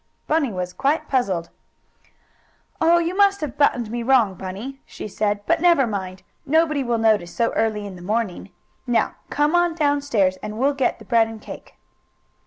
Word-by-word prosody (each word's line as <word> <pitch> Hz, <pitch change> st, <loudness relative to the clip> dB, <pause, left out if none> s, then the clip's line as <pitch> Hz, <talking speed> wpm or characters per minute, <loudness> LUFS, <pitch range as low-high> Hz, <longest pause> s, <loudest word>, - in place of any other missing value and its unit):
Bunny 305 Hz, -5 st, +1 dB
was 180 Hz, -1 st, -4 dB
quite 300 Hz, -, 0 dB
puzzled. 195 Hz, -11 st, -1 dB, 1.3 s
"Oh, 335 Hz, +1 st, +5 dB
you 340 Hz, +2 st, -1 dB
must 400 Hz, 0 st, +4 dB
have 290 Hz, -4 st, -4 dB
buttoned 245 Hz, -6 st, +1 dB
me 240 Hz, 0 st, -3 dB
wrong, 235 Hz, -5 st, +3 dB
Bunny," 200 Hz, +10 st, -7 dB
Sue -, -, -8 dB
said. 205 Hz, 0 st, -1 dB
"But 335 Hz, -1 st, +1 dB
never 340 Hz, -6 st, +5 dB
mind. 190 Hz, -4 st, -5 dB, 0.2 s
Nobody 305 Hz, -1 st, +2 dB
will 240 Hz, -2 st, 0 dB
notice 215 Hz, -6 st, +2 dB
so 230 Hz, -1 st, +1 dB
early 215 Hz, -2 st, -1 dB
in 195 Hz, -2 st, -8 dB
the -, -, -12 dB
morning. 205 Hz, 0 st, -2 dB, 0.4 s
Now 240 Hz, -1 st, +1 dB, 0.2 s
come 295 Hz, +2 st, +1 dB
on 350 Hz, -1 st, +2 dB
down 290 Hz, -3 st, +1 dB
stairs, 200 Hz, -10 st, +1 dB
and 215 Hz, 0 st, -6 dB
we'll 275 Hz, +4 st, +2 dB
get 275 Hz, -2 st, 0 dB
the 220 Hz, -, -14 dB
bread 225 Hz, +1 st, +3 dB
and 225 Hz, -1 st, -9 dB
cake." -, -, -11 dB
235 Hz, 180 wpm, -22 LUFS, 205-295 Hz, 1.3 s, Oh